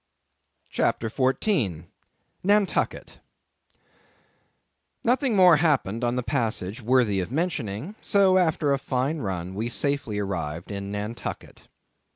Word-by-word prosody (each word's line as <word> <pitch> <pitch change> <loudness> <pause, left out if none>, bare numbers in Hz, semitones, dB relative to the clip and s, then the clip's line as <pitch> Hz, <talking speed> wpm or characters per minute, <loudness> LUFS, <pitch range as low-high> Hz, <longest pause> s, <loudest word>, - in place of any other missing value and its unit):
CHAPTER 115 -1 0
14. 130 - 0 0.6
Nantucket. 205 +1 +1 1.8
Nothing 250 0 +2
more 180 -4 +7
happened 135 - +1
on 120 0 +1
the 125 - -1
passage 115 -4 -2
worthy 115 -4 +2
the 90 - -5
mentioning; 150 - -2
so, 195 -2 +4
after 160 -4 +2
a 135 - 0
fine 135 +4 -1
run, 95 -5 -4
we 110 +4 -2
safely 140 -4 -1
arrived 85 -4 -4
in 100 0 -5
Nantucket. 105 +3 -6
125 Hz, 110 wpm, -25 LUFS, 100-160 Hz, 1.8 s, more